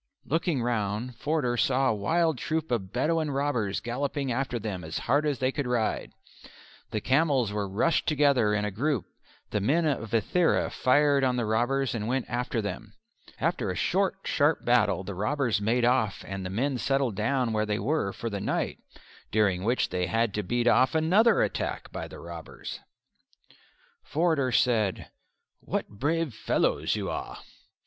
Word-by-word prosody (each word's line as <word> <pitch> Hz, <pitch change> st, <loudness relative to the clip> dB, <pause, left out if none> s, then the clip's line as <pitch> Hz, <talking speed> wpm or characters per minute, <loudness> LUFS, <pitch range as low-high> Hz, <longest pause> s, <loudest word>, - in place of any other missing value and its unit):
Looking 160 Hz, -4 st, 0 dB
round 115 Hz, +1 st, -2 dB
Forder 145 Hz, -3 st, 0 dB
saw 130 Hz, +2 st, +2 dB
a -, -, +2 dB
wild 160 Hz, +7 st, +1 dB
troop 160 Hz, -3 st, -2 dB
of 100 Hz, -6 st, -1 dB
Bedouin 155 Hz, +5 st, 0 dB
robbers 135 Hz, -8 st, -1 dB
galloping 135 Hz, +2 st, -2 dB
after 125 Hz, 0 st, -1 dB
them 100 Hz, -5 st, -4 dB
as 80 Hz, 0 st, -4 dB
hard 145 Hz, +5 st, +1 dB
as 145 Hz, -3 st, 0 dB
they 130 Hz, +2 st, +1 dB
could 145 Hz, -2 st, -3 dB
ride. 120 Hz, -3 st, -1 dB, 0.8 s
The 110 Hz, -, -2 dB
camels 135 Hz, -5 st, +2 dB
were 105 Hz, -2 st, -2 dB
rushed 155 Hz, -, +1 dB
together 140 Hz, -8 st, +3 dB
in 105 Hz, 0 st, 0 dB
a 105 Hz, -, -2 dB
group: 130 Hz, -, -1 dB, 0.5 s
the 105 Hz, -, 0 dB
men 150 Hz, -, +2 dB
of 130 Hz, -7 st, -1 dB
Ithera 140 Hz, -, +2 dB
fired 140 Hz, +1 st, +3 dB
on 130 Hz, -1 st, +2 dB
the 120 Hz, -2 st, 0 dB
robbers 120 Hz, +5 st, +1 dB
and 110 Hz, -2 st, -3 dB
went 130 Hz, +1 st, 0 dB
after 120 Hz, -2 st, -1 dB
them. 100 Hz, -2 st, -6 dB, 0.4 s
After -, -, 0 dB
a -, -, -2 dB
short, 195 Hz, 0 st, +1 dB
sharp 150 Hz, +2 st, +1 dB
battle 120 Hz, -5 st, +3 dB
the 100 Hz, +1 st, -6 dB
robbers 110 Hz, +2 st, 0 dB
made 120 Hz, +3 st, +2 dB
off 120 Hz, -5 st, +1 dB
and 95 Hz, 0 st, -5 dB
the 90 Hz, -, -4 dB
men 125 Hz, +6 st, -1 dB
settled 135 Hz, -3 st, 0 dB
down 120 Hz, +2 st, 0 dB
where 110 Hz, 0 st, 0 dB
they 105 Hz, -1 st, 0 dB
were 120 Hz, -2 st, 0 dB
for 115 Hz, -, -6 dB
the 100 Hz, -1 st, -3 dB
night, -, -, -2 dB, 0.5 s
during 100 Hz, -4 st, +1 dB
which 120 Hz, +4 st, +1 dB
they 90 Hz, -1 st, -1 dB
had 115 Hz, +3 st, +1 dB
to 105 Hz, -, -1 dB
beat 120 Hz, +3 st, -1 dB
off 130 Hz, +5 st, +4 dB
another 185 Hz, +9 st, +4 dB
attack -, -, -3 dB
by -, -, -5 dB
the -, -, -11 dB
robbers. -, -, -8 dB, 1.2 s
Forder 160 Hz, -, +1 dB
said, 115 Hz, -5 st, +1 dB, 0.5 s
"What -, -, -3 dB
brave 150 Hz, +6 st, -1 dB
fellows -, -, 0 dB
you -, -, -3 dB
are!" -, -, -5 dB
125 Hz, 170 wpm, -27 LUFS, 110-145 Hz, 1.2 s, off